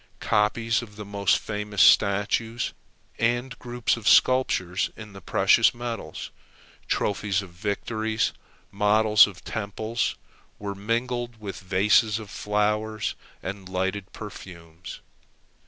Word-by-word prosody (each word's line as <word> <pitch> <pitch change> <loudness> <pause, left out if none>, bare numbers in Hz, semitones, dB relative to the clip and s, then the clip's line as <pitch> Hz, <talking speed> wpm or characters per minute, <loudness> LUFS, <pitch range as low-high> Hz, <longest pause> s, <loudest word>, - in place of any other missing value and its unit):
Copies 115 +2 +1
of 105 -3 -11
the 105 0 -8
most 100 -2 +2
famous 105 -1 -5
statues, 105 +5 +3 0.5
and 120 +3 0
groups 120 -1 -1
of 115 -3 -6
sculpture 130 -9 +4 0.2
in 105 -2 -10
the 95 - -11
precious - - +4
metals; 120 -2 -6 0.6
trophies 100 -1 0
of 95 - -12
victories; 110 +4 -2 0.4
models 105 +1 +5
of 95 -3 -11
temples; 110 +2 -2 0.4
were 100 -1 -5
mingled 120 +3 -2
with 100 -2 -6
vases 105 +4 +3
of 110 -2 -9
flowers 105 +1 -1 0.3
and 95 -1 -6
lighted 95 +1 -2
perfumes. 85 -5 -10
105 Hz, 110 wpm, -25 LUFS, 100-115 Hz, 0.6 s, models